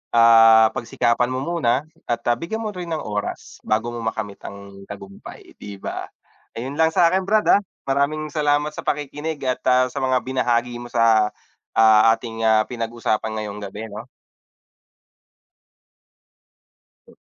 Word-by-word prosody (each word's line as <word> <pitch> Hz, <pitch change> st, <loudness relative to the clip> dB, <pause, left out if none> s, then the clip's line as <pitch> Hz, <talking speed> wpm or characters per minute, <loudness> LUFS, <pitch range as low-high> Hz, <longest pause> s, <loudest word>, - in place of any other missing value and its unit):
ah, 115 Hz, -1 st, +7 dB
pagsikapan 120 Hz, +1 st, 0 dB
mo 130 Hz, -, -2 dB
muna 150 Hz, -6 st, 0 dB, 0.2 s
at, 120 Hz, 0 st, -1 dB
ah, -, -, +2 dB
bigyan 220 Hz, +7 st, -4 dB
mo 215 Hz, -, -3 dB
rin 175 Hz, -1 st, -6 dB
ng 155 Hz, -, -2 dB
oras, 105 Hz, -1 st, -5 dB
bago 110 Hz, +2 st, 0 dB
mo 120 Hz, -, -6 dB
makamit 105 Hz, -2 st, -4 dB
ang 100 Hz, 0 st, -11 dB
tagumpay, 100 Hz, -1 st, -11 dB
'di 100 Hz, -1 st, -8 dB
ba? -, -, -5 dB, 0.5 s
Ayun 130 Hz, +5 st, -5 dB
lang 160 Hz, 0 st, +4 dB
sakin 185 Hz, +3 st, +3 dB
brad, 215 Hz, 0 st, +2 dB
ah. -, -, -10 dB, 0.3 s
Maraming 145 Hz, +2 st, 0 dB
salamat 150 Hz, 0 st, +1 dB
sa -, -, -9 dB
pakikinig 150 Hz, +1 st, -3 dB
at, 130 Hz, -, -1 dB
ah, 130 Hz, 0 st, +4 dB
sa -, -, -4 dB
mga 130 Hz, -1 st, +1 dB
binahagi 120 Hz, -2 st, -1 dB
mo 120 Hz, -, -8 dB
sa, 110 Hz, -2 st, +3 dB, 0.5 s
ah, 110 Hz, -1 st, +6 dB
ating, 115 Hz, -1 st, -7 dB
ah, 110 Hz, 0 st, +4 dB
pinag-usapan 115 Hz, -2 st, -3 dB
ngayong 105 Hz, 0 st, -6 dB
gabi, 105 Hz, +3 st, -7 dB
'no? 105 Hz, -, -8 dB, 3.0 s
Hmm. -, -, -19 dB
120 Hz, 145 wpm, -21 LUFS, 110-145 Hz, 3.0 s, ah